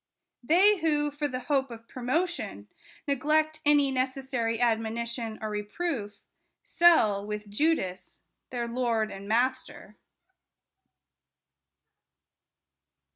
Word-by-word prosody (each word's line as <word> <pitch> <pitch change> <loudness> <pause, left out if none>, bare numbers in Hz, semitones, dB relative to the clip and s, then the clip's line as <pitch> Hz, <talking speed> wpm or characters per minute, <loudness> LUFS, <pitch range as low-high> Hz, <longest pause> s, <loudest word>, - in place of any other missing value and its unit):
They 375 +10 +4
who, 295 -2 +1
for 290 +1 -2
the 255 -2 -4
hope 270 0 0
of 230 -1 -11
promotion, 255 - -2 0.4
neglect 310 +3 +1
any 290 -2 +4
necessary 255 -3 -1
admonition 230 0 -1
or 215 - -3
reproof, 210 +1 -3 0.5
sell 220 -13 +4
(with 210 0 -5
Judas) 205 - -1 0.3
their 240 -2 -3
Lord 235 -3 0
and 195 +1 -9
Master. 255 +4 -1
250 Hz, 90 wpm, -28 LUFS, 220-295 Hz, 0.5 s, They